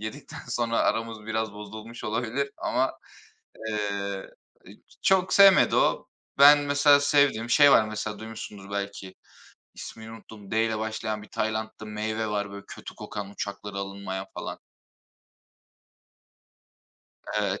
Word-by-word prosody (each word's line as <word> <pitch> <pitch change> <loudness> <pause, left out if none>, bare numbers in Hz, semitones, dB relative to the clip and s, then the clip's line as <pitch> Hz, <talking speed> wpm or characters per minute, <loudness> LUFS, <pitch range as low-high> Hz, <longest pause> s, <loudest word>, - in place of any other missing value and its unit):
Yedikten 110 +7 -8
sonra 120 -1 0
aramız 115 -1 -1
biraz 110 -1 -2
bozulmuş 110 +3 -9
olabilir 120 +5 -2
ama, 130 +1 0 0.8
ııı, 100 -2 -3 0.7
çok 190 -1 +3
sevmedi 195 -1 +7
o. - - +2 0.3
Ben 145 +1 +9
mesela 145 0 +4
sevdiğim 140 -5 +2
şey 145 +2 +7
var. 110 - +6
Mesela 110 -1 -4
duymuşsunuzdur 105 -3 -9
belki, 100 -2 -5 0.6
ismini 110 0 -9
unuttum, 110 -2 -13
d'yle 110 0 +1
başlayan 110 -1 -3
bir 105 - -13
Tayland'da 110 0 -3
meyve 110 +1 -3
var 105 -1 -2
böyle 100 0 -9
kötü - - -10
kokan, 100 -2 -7
uçaklara 100 0 -6
alınmayan 100 -1 -5
falan. - - -6 2.8
Evet. 100 -1 -1
110 Hz, 115 wpm, -26 LUFS, 100-115 Hz, 2.8 s, Ben